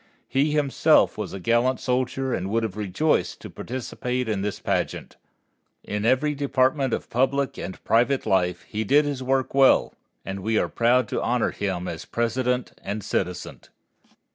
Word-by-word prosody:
He 140 +3 +1
himself 150 -1 +3
was 105 -3 -5
a 95 - -6
gallant 120 +6 +2
soldier 130 +1 -1
and 95 -2 -2
would 115 +2 0
have 105 -4 -3
rejoiced 105 - 0
to - - -9
participate 125 0 -4
in 105 -3 -1
this 105 0 -3
pageant. - - -2 0.7
In 105 +1 -3
every 130 +5 +2
department 135 -1 +1
of - - -2
public 135 +3 0
and 95 - -7
private 125 +4 +2
life 90 -2 +1
he 110 +1 -3
did 145 +7 +4
his 140 -3 -3
work 130 0 0
well, 135 -1 +4 0.3
and 95 0 -4
we 110 +3 0
are - - +1
proud 120 0 +2
to - - -1
honor 120 -1 +1
him 95 -3 -3
as 80 - -6
President 125 +2 -1
and 105 +1 -4
citizen. 90 -1 -3
120 Hz, 165 wpm, -24 LUFS, 105-135 Hz, 0.7 s, did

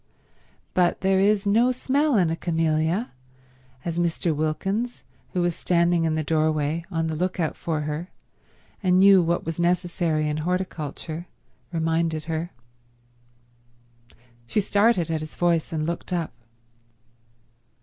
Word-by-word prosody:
But 180 -1 +2
there 190 0 +3
is 205 +1 +3
no 230 +5 +4
smell 270 +2 +1
in 175 -4 +3
a - - 0
camellia, 165 +5 0 0.7
as 170 0 -2
Mr. 170 -1 0
Wilkins, 195 +10 -2 0.3
who 180 -2 +1
was 175 -2 0
standing 170 -1 +2
in 160 -1 +1
the 155 - 0
doorway 155 +1 0
on 165 -3 -1
the 160 - -2
look 180 +3 -2
out 160 -3 0
for 160 -2 -2
her 150 +4 -4 0.7
and 185 -2 +3
knew 195 -1 +7
what 170 0 0
was 165 +1 -4
necessary 175 -3 +1
in 150 0 -1
horticulture, 170 -1 -3 0.4
reminded 165 -1 0
her. 160 +2 -3 2.0
She 165 - +1
started 200 -4 +2
at 160 -1 -1
his 155 - -8
voice 170 -2 +1
and 155 -2 -1
looked 170 +3 -4
up. 170 -3 -2
170 Hz, 135 wpm, -24 LUFS, 160-185 Hz, 2.0 s, knew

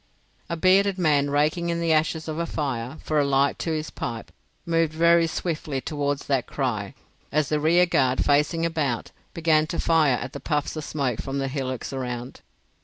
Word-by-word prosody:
A 170 - -2
bearded 190 +3 +4
man 145 -5 +2
raking 155 +4 +1
in 170 0 -1
the 165 -1 +2
ashes 155 +1 0
of 155 +1 -3
a 170 - -1
fire 135 -2 -3
for 155 -1 +1
a - - +4
light 140 0 +2
to 165 - -2
his 155 0 -3
pipe 115 -2 -5 0.3
moved 165 -2 +1
very 170 +1 +4
swiftly 155 -4 -3
towards 145 +1 -2
that 135 -3 0
cry, 115 -8 -3 0.4
as 150 -1 +1
the 150 - +1
rearguard, 155 -5 +3
facing 150 +3 +2
about, 150 -8 -2 0.2
began 155 -2 +3
to 170 +1 -4
fire 155 -5 +3
at 135 - -6
the 140 - -6
puffs 150 +2 -2
of 155 - -4
smoke 135 -6 -2
from 135 0 -4
the 135 0 -1
hillocks 130 -2 -4
around. 125 -1 -5
150 Hz, 180 wpm, -25 LUFS, 135-165 Hz, 0.4 s, bearded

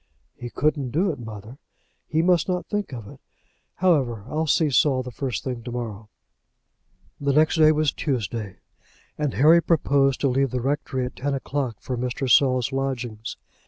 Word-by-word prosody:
"He 120 - -7
couldn't 145 -1 0
do 175 +9 +1
it, 140 - -8
mother. 110 +3 -9 0.5
He 160 +1 +1
must 175 -2 +3
not 180 -1 -1
think 205 -4 -3
of 115 -5 -7
it. - - -13 0.5
However, 135 - +1
I'll 155 +3 -1
see 150 0 +2
Saul 130 -1 +3
the 125 - -7
first 125 +1 -3
thing 125 -4 -4
to 120 +1 -7
morrow." 110 -3 -6 1.1
The 140 -1 +1
next 155 +3 +3
day 155 -1 +6
was 155 -2 +2
Tuesday, 110 - -3 0.6
and 150 -3 -2
Harry 160 +5 +6
proposed 140 -5 +2
to 140 - +3
leave 135 +1 +1
the 125 - -2
rectory 130 0 -1
at 125 - -7
ten 140 +1 -1
o'clock 135 -3 -3
for 125 - -4
Mr. 125 +2 -2
Saul's 130 -1 +4
lodgings. 125 -5 -3
135 Hz, 170 wpm, -24 LUFS, 120-150 Hz, 1.1 s, day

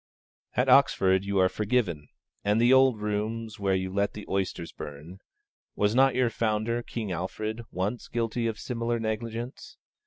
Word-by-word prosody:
At - - +3
Oxford 95 0 +4
you 100 0 -1
are 95 -1 +5
forgiven; 100 -8 -1 0.4
and 105 +2 +2
the 120 +2 +5
old 130 -4 +5
rooms 105 +1 -3
where 95 -1 +1
you 95 0 -2
let 100 +1 0
the 105 - -8
oysters 95 -3 -2
burn 75 +6 -9 0.6
(was 105 +1 +2
not 135 +1 +4
your 125 -2 +2
founder, 110 +2 0
King 110 -4 -5
Alfred, 110 +6 -3
once 100 +6 -3
guilty 115 0 -1
of 110 -1 -3
similar 120 -1 -2
negligence?) 115 +3 -4
110 Hz, 155 wpm, -28 LUFS, 95-115 Hz, 0.6 s, are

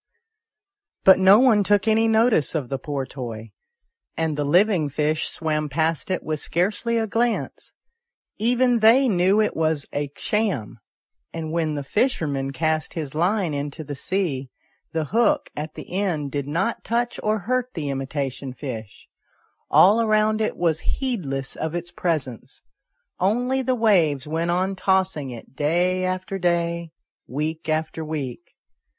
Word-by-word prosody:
But 190 -1 +7
no 190 +2 +7
one 225 -4 +5
took 205 +2 +2
any 220 +1 +4
notice 220 - +3
of 140 -6 -2
the 135 - -2
poor 140 -3 -3
toy, 115 -4 -7 0.7
and 160 -2 0
the 145 - -1
living 175 +1 +3
fish 150 +2 0
swam 155 -2 -2
past 160 +2 -1
it 185 - -1
with 155 -1 -3
scarcely 210 +9 0
a 225 - +1
glance; 230 +2 -2 0.7
even 245 +2 +3
they 235 +5 +6
knew 190 0 +3
it 215 - +1
was 160 -3 0
a 145 -1 -2
sham; 180 - -1 0.5
and 160 -1 -5
when 160 -2 0
the 145 - -3
fisher 210 - 0
man 135 -2 -2
cast 155 +4 -1
his 150 -5 -4
line 175 +1 +1
into 145 +2 -4
the 145 - -6
sea, 140 -4 -2 0.4
the 160 -1 -1
hook 260 - +1
at 150 +1 -5
the - - -9
end 175 -8 -1
did 140 -1 -3
not 170 +10 -1
touch 240 +1 -1
or 215 0 +1
hurt 250 +4 -2
the 150 -4 -3
imitation 135 -1 -4
fish; 115 -8 -7 0.6
all 210 +5 +6
around 215 0 +2
it 215 - -1
was 165 -2 +1 0.2
heedless 150 - -2
of 160 +1 -3
its 175 0 -4
presence, 155 -10 -3 0.6
only 245 +8 +1
the 255 0 0
waves 170 - +2
went 165 +2 -1
on 185 +3 0
tossing 190 -7 +1
it 120 +1 -10
day 175 +5 +1
after 185 +1 -2
day, 170 -1 0 0.4
week 155 +4 -3
after 155 +1 -1
week. 150 0 -5
170 Hz, 150 wpm, -23 LUFS, 145-210 Hz, 0.7 s, But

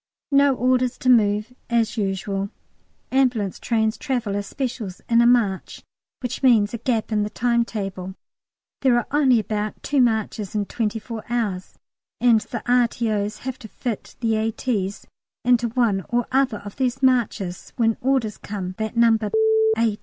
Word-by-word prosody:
No 280 -1 +5
orders 255 0 +1
to 255 - +3
move, 215 0 +3 0.2
as 230 -2 +1
usual. 195 -1 -2 0.6
Ambulance 245 -7 +1
trains 220 -2 0
travel 245 -8 -2
as 200 0 -3
"specials" 240 -8 -4
in 235 0 +4
a 235 - +5
"marche," 220 -6 +1 0.4
which 245 - -3
means 230 -6 +4
a 235 - -3
gap 230 -2 -1
in 215 -1 +2
the 210 - -1
timetable. 210 -6 -2 0.7
There 255 -3 +4
are 240 - 0
only 275 -4 +4
about 210 0 -3
two 280 -1 +2
marches 220 -4 0
in 205 -1 0
twenty 220 0 -2
four 225 0 -7
hours, 210 -6 -2 0.4
and 235 -3 +4
the 220 - -6
R.T.O.'s 225 -4 +1
have 260 -1 -4
to 230 - -9
fit 230 0 -5
the 225 -2 +1
A.T.'s 215 -2 -2 0.4
in 245 0 +5
to 235 0 -2
one 225 -5 +1
or 240 0 +1
other 260 -4 +2
of 205 - -9
these 260 0 -1
marches 225 -8 0
when 225 -2 +2
orders 255 -5 0
come 190 -3 -5
that 220 +1 -3
No. 230 -1 +5 0.6
A. 220 -2 +1
230 Hz, 160 wpm, -23 LUFS, 210-245 Hz, 0.7 s, No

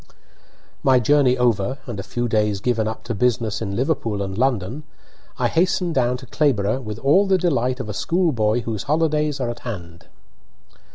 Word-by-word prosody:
My 130 -2 +4
voyage 130 +1 +3
over, 120 0 +1
and 115 -6 -6
a - - -1
few 120 +5 -3
days 105 -3 +1
given 110 0 0
up 110 0 -5
to 120 - -4
business 115 -1 0
in 100 -3 -3
Liverpool 115 -6 -1
and 95 -1 -5
London, 125 +1 0 0.6
I - - +1
hastened 180 0 +1
down 125 -2 +1
to 130 - -11
Clayborough 125 -4 +1
with 105 -3 -6
all 150 - +3
the 190 -1 +4
delight 135 -8 0
of 130 - -4
a 105 - -4
school 170 - +1
boy 110 -1 +1
whose 110 -3 -4
holidays 150 -2 +1
are 120 -2 -1
at 120 - -9
hand. 90 -8 -8
120 Hz, 180 wpm, -22 LUFS, 110-145 Hz, 0.6 s, My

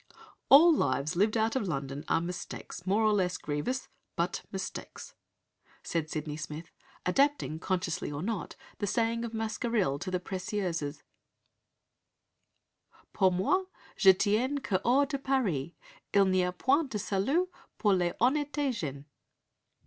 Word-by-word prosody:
"All 325 +5 +9
lives 140 - 0
lived 215 +5 +2
out 220 +2 +1
of 220 -7 0
London 140 -3 -3
are - - +3
mistakes 175 +1 -6
more 205 +4 +3
or 215 -1 +4
less 180 -4 +1
grievous 150 - -3 0.3
but 175 +1 -1
mistakes," 190 -1 -6 0.7
said 160 -2 -2
Sydney 150 -1 -4
Smith, 160 +1 -7 0.3
adapting, 270 - +2
consciously 170 -4 -2
or 145 +2 -4
not, 215 -3 -3 0.2
the 205 - -1
saying 230 +2 0
of 235 - -4
Mascarille 220 - 0
to 185 - -4
the 185 -1 0
Précieuses: 180 -5 -3 2.1
"Pour 190 -2 +4
moi, 285 - +1 0.3
Je 190 - +7
tiens 215 +9 +1
que 185 -3 +1
hors 270 +4 +4
de 275 -1 -3
Paris, 205 - 0 0.4
il 200 -1 +6
n'y 185 -1 +3
a 180 - 0
point 270 - +2
de 220 - -3
salut 215 - +1 0.3
pour 205 -2 +3
les 175 -2 +1
honnetes 285 +1 +1
gens." 145 - -5
195 Hz, 140 wpm, -30 LUFS, 170-235 Hz, 2.1 s, All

